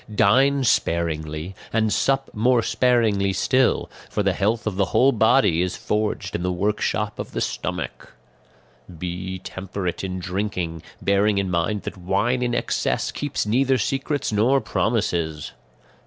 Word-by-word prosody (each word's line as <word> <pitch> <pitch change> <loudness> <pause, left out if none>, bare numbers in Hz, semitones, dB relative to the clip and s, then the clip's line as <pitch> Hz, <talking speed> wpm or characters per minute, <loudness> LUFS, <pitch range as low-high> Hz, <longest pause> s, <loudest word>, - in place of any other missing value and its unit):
"Dine 135 +8 +4
sparingly 80 -4 0 0.2
and 110 -1 +1
sup 135 0 +1
more 120 +2 +3
sparingly 110 -7 +2
still; 130 +7 +2 0.2
for 105 - -1
the 95 -1 +2
health 105 +3 0
of 110 -3 -2
the 100 0 +2
whole 135 +7 +4
body 110 -7 +3
is 90 0 -2
forged 105 0 -2
in - - -2
the 90 +1 0
workshop 105 +2 -1
of - - -6
the - - -2
stomach. - - -4 0.8
"Be 90 +2 -4
temperate 95 0 -5
in 95 -1 -3
drinking, 90 -3 -3 0.2
bearing 100 +1 +3
in 95 -2 0
mind 90 +4 0
that 95 - -6
wine 100 +8 0
in 120 -1 0
excess - - -1
keeps 145 -6 -2
neither 130 +5 +2
secrets 135 +4 -1
nor 115 +6 +3
promises. 85 - -1
105 Hz, 140 wpm, -23 LUFS, 90-120 Hz, 0.8 s, Dine